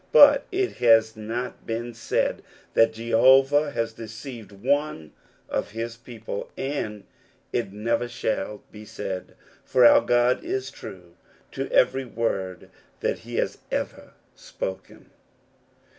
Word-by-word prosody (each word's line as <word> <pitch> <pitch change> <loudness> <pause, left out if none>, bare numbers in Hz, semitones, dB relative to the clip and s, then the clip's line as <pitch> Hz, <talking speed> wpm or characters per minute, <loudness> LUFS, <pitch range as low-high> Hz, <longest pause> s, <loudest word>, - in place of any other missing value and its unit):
But - - +8
it 385 0 -1
has 115 -1 +5
not 115 +4 -5
been 120 +1 -3
said 115 - -1 0.3
that 115 0 +4
Jehovah 130 +6 +4
has 115 -4 -2
deceived 115 -1 -9
one 125 - -1 0.4
ot - - -1
his 115 +1 -4
people, 115 -3 -7
and 110 -7 -3 0.5
it 115 -5 -1
never 115 +4 -1
shall 105 -3 -3
be 105 0 -11
said; 95 -3 -6 0.3
for 130 -1 +3 0.2
God 120 +1 +2
is 130 0 -3
true 90 -2 -11 0.3
to 135 0 -4
every 130 +1 +3
word 95 -6 -3 0.3
that - - 0
he - - -8
has - - -1
everspoken. 95 - -6
115 Hz, 115 wpm, -25 LUFS, 110-125 Hz, 0.5 s, But